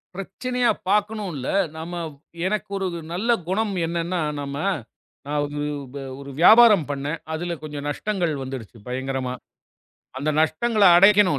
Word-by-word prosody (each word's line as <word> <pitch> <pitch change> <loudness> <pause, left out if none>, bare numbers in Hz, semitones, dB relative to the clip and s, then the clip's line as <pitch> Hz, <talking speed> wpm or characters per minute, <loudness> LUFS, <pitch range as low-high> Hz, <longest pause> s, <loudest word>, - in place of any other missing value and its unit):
பிரச்சனையா 245 +6 -1 0.2
பாக்கணும் 210 -1 +1
இல்ல. 130 -1 -5 0.3
நாம 170 +2 -5 0.5
எனக்கு 210 0 -2
ஒரு 195 -1 -1 0.3
நல்ல 200 +7 -2 0.2
குணம் 210 +1 0
என்னன்னா, 170 +1 -2 0.2
நாம 140 -1 -5 1.6
ஒரு 140 0 -9
வியாபாரம் 215 -5 +8
பண்ணேன், 145 +3 -3 0.2
அதுல 175 +1 -3
கொஞ்சம் 145 -1 -5
நஷ்டங்கள் 175 +1 -1
வந்துருச்சு 130 -4 -7
பயங்கரமா. 130 0 -2 0.9
அந்த 145 +3 0
நஷ்டங்கள 210 +8 +1
அடைக்கணும் 195 -4 +6
175 Hz, 110 wpm, -23 LUFS, 145-210 Hz, 1.6 s, வியாபாரம்